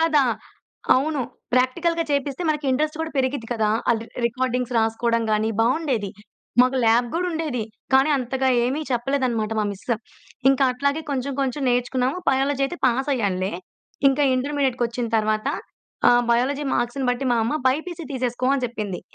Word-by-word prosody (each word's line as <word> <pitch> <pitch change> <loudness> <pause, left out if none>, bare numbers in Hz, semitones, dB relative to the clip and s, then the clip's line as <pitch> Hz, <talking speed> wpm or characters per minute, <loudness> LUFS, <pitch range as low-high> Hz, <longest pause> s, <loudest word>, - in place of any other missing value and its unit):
కదా! 310 -4 +4 0.7
అవును. 290 +1 0 0.3
ప్రాక్టికల్‌గా 330 +7 +1
చేపిస్తే 280 +2 -1
మనకి 300 -2 0
ఇంట్రెస్ట్ 305 +4 0
కూడా 320 0 -3
పెరిగిద్ది 260 -3 -1
కదా! 215 -2 +1 0.2
అది 225 -1 0 0.2
రికార్డింగ్స్ 250 0 -2
రాసుకోవడం 230 +1 +1
గాని 215 +1 +1
బావుండేది. 245 -5 +1 0.5
మాకు 255 +1 +3
ల్యాబ్ 235 +2 +4
గూడా 360 +2 0
ఉండేది. 305 -8 -2 0.3
కానీ 270 +3 +5
అంతగా 265 +1 -1 0.2
ఏమి 265 +5 -1
చెప్పలేదన్నమాట 245 -3 0
మా 215 - +1
మిస్. 195 - -12 0.7
ఇంకా 270 0 +3
అట్లాగే 280 +4 0
కొంచెం 275 0 -2
కొంచెం 270 +1 -1
నేర్చుకున్నాము. 250 +4 0
బయాలజీ 275 +1 +1
అయితే 350 +5 -7
పాస్ 255 +3 +1
అయ్యానులే. 195 -5 -1 0.6
ఇంకా 270 +2 +1
ఇంటర్మీడియేట్‌కొచ్చిన 255 -4 -1
తరువాత, 215 0 0 0.6
ఆహ్, 245 0 +5
బయాలజీ 275 +5 +1
మార్క్స్‌ని 245 +2 -1
బట్టి 245 +2 -2
మా 235 - +2
అమ్మ 235 +7 0
"బైపీసీ 330 +5 -2
తీసేసుకో" 250 -1 -1
అని 260 -2 -1
చెప్పింది. 210 -6 -5
255 Hz, 145 wpm, -23 LUFS, 235-280 Hz, 0.7 s, కానీ